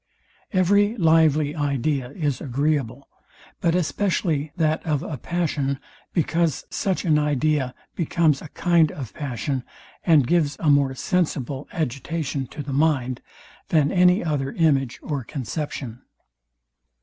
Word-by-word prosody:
Every 205 +4 +3
lively 160 -4 +3
idea 140 -3 -1
is 145 -3 -2
agreeable, 140 -1 -1 0.5
but 170 0 +1
especially 170 -4 0
that 160 -2 +1
of 150 -3 -1
a 160 - -4
passion, 145 -3 -1 0.3
because 165 -3 0
such 190 -2 -1
an 155 -3 +4
idea 150 -2 0 0.2
becomes 160 -3 +1
a - - -8
kind 165 0 +2
of 125 -9 -7
passion, 135 -1 -3 0.4
and 155 -6 +5
gives 150 -1 +1
a 155 -3 +3
more 140 -2 +3
sensible 145 -5 -1
agitation 145 -1 -3
to 145 - -7
the 140 0 -5
mind, 135 -4 +1 0.5
than 150 -3 +3
any 180 +1 +4
other 140 -4 -1
image 135 -6 +1
or 145 -4 -3
conception. 130 -2 -5
150 Hz, 125 wpm, -23 LUFS, 135-165 Hz, 0.5 s, and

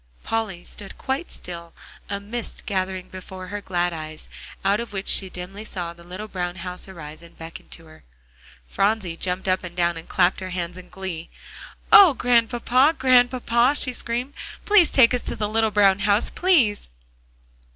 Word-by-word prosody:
Polly 215 -6 -2
stood 200 -2 -9
quite 275 +6 -3
still, 170 -1 -8 0.4
a 200 - -2
mist 225 +4 -6
gathering 190 -3 -2
before 185 0 -9
her 205 +1 -4
glad 175 -2 -1
eyes, 155 -1 -8 0.4
out 200 +2 +3
of 235 -2 -6
which 195 0 -4
she 190 - +3
dimly 185 +4 -8
saw 175 -5 -5
the 170 0 -16
little 185 +5 -7
brown 180 -3 -4
house 180 +1 -6
arise 155 -4 -10
and 170 0 -15
beckon 165 0 -10
to 165 - -11
her. 155 - -17 0.6
Phronsie 195 - 0
jumped 180 +2 -2
up 185 0 +1
and 175 -1 -8
down 170 -1 +1
and 165 - -10
clapped 180 0 +2
her 185 -1 -6
hands 180 -1 -4
in 180 0 -12
glee. 185 -4 -6 0.6
"Oh, 380 -9 +9
Grandpapa, 245 +5 +3
Grandpapa!" 250 0 +3
she 255 -3 -1
screamed, 245 +3 -3 0.3
"please 405 -6 +6
take 255 -2 +5
us 250 - 0
to - - -4
the 210 - -2
little 220 +1 +1
brown 200 -2 +4
house, 205 +2 +2
please!" 275 - +2
195 Hz, 170 wpm, -23 LUFS, 180-235 Hz, 0.6 s, Oh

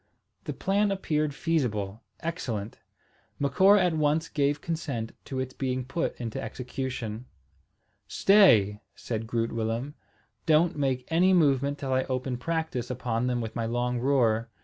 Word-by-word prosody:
The - - -3
plan 200 +2 +1
appeared 155 -7 -1
feasible, 110 -11 -1 0.2
excellent. 120 - -4 0.6
Macora 190 +9 +5
at 175 - +1
once 155 +1 +1
gave 145 -1 +1
consent 140 -9 -3
to 130 - -4
its 130 0 -3
being 130 -2 -2
put 165 +6 -3
into 115 -3 -4
execution. 125 -1 -5 0.8
"Stay," 110 - +5
said 115 -1 -4
Groot 115 -1 -1
Willem. 115 +5 -2 0.5
"Don't 160 +2 +4
make 135 -3 -1
any 180 +3 +4
movement 140 -4 +3
till 135 -2 -2
I 130 0 +1
open 130 -1 -2
practice 160 -3 -2
upon 125 -1 -1
them 125 -1 0
with 110 -1 -5
my 115 -1 -1
long 120 +1 -1
roer. 120 -4 +2
130 Hz, 140 wpm, -27 LUFS, 115-155 Hz, 0.8 s, Macora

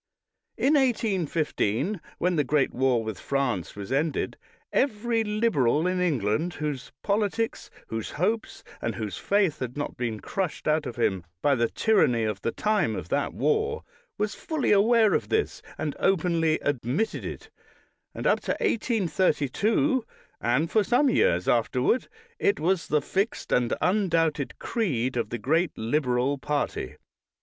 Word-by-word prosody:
In 280 - +3
1815, 190 - 0 0.2
when 180 0 +1
the 150 - +2
great 140 +1 +1
war 125 -3 +2
with 110 -3 -5
France 130 - -1
was 100 +3 -7
ended, 145 +2 0 0.4
every 230 -2 +1
Liberal 180 - +2
in 185 0 +1
England, 155 - 0
whose 150 -4 -4
politics, 210 +2 -1 0.2
whose 110 -1 -3
hopes, 215 +8 -1 0.2
and 115 - -2
whose 105 -5 -4
faith 200 -6 +1
had 125 +1 -5
not 145 - -4
been 115 -3 -2
crushed 190 - -3
out 155 -1 +2
of - - -6
him 95 -7 0 0.2
by 145 - +4
the 120 -3 +1
tyranny 155 - +2
of 105 -3 -2
the 115 - -1
time 215 - +1
of - - -6
that - - 0
war, 450 +1 0 0.3
was 210 0 -1
fully 315 -4 -1
aware 215 +1 +5
of - - 0
this, 435 0 0 0.2
and 150 -2 -3
openly 170 -4 +2
admitted 140 - -1
it, - - -7 0.6
and - - -5
up - - +4
to - - -2
1832, 220 - +1 0.4
and 140 +8 +1
for 215 - +4
some 245 +7 +3
years 90 - +2
afterward, 125 - +2 0.3
it 205 - +2
was 180 +2 +1
the 150 -1 +1
fixed 195 +8 -2
and 120 -1 +2
undoubted 165 -7 +1
creed 130 - -1
of 120 - -1
the 120 - -3
great 160 - 0
Liberal 125 +2 0
party. 145 - -2
160 Hz, 145 wpm, -26 LUFS, 125-210 Hz, 0.6 s, aware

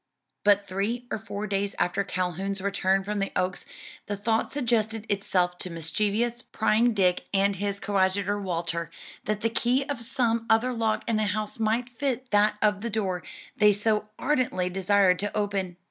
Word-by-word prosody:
But 205 -1 +4
three 210 +6 -2
or - - -1
four 210 -1 -5
days 200 -1 -1
after 180 +3 +1
Calhoun's 185 +2 -2
return 195 -1 +1
from 205 +1 -2
the 195 - -1
Oaks, 180 0 -1 0.4
the 205 - -3
thought 220 +2 0
suggested 225 -5 0
itself 180 -3 0
to 185 - -3
mischievous, 210 +8 -1
prying 230 -1 +2
Dick 180 -3 +2
and 195 0 +3
his 200 +1 -2
coadjutor 200 +1 +1
Walter, 170 -3 -2 0.4
that 210 0 -1
the 230 - +1
key 245 +4 +2
of 285 -4 -4
some 230 -2 0
other 225 +3 +3
lock 225 -2 0
in 230 -2 +1
the 215 - +1
house 210 +2 -3
might 225 +2 +1
fit 255 0 -3
that 210 +1 +4
of 205 -2 +2
the 235 - -2
door 195 -5 -1 0.4
they 210 0 +6
so 210 +1 0
ardently 250 -11 0
desired 190 0 +3
to 205 +1 -2
open. 195 -4 -1
205 Hz, 170 wpm, -27 LUFS, 195-225 Hz, 0.4 s, they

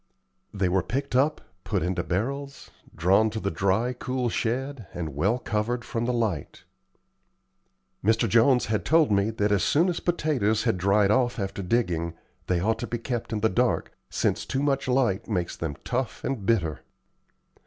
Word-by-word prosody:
They 100 -3 0
were 90 +1 +2
picked 135 +8 -3
up, 145 +4 +2 0.2
put - - -1
into 90 0 -1
barrels, 135 - -3 0.2
drawn 95 +6 +3
to 110 - -4
the 100 - -2
dry, 100 +9 +1
cool 125 0 -2
shed, 125 0 -2
and 80 -4 -4
well 100 - +2
covered 120 +1 -2
from 115 0 -2
the 125 - +1
light. 110 - -2 1.4
Mr. 110 +3 +3
Jones 120 +4 +4
had 110 -1 -1
told 160 -5 +4
me 100 +1 +3
that 105 -2 0
as 100 -2 +3
soon 170 +5 +3
as 175 - -2
potatoes 135 -11 +1
had 115 -6 +1
dried 100 +2 +3
off 120 +1 +2
after 100 -2 -3
digging, 90 -5 0 0.3
they 90 -1 +1
ought 110 +5 0
to 120 - -4
be 120 - -2
kept 120 0 -4
in 110 -2 -2
the 110 - +4
dark, 125 +2 0 0.2
since - - 0
too 135 +1 -2
much 140 -2 0
light 125 -6 +1
makes 90 -5 -1
them 80 -4 -4
tough 125 0 -3
and 115 -8 -3
bitter. 85 - +1
110 Hz, 175 wpm, -26 LUFS, 95-125 Hz, 1.4 s, Jones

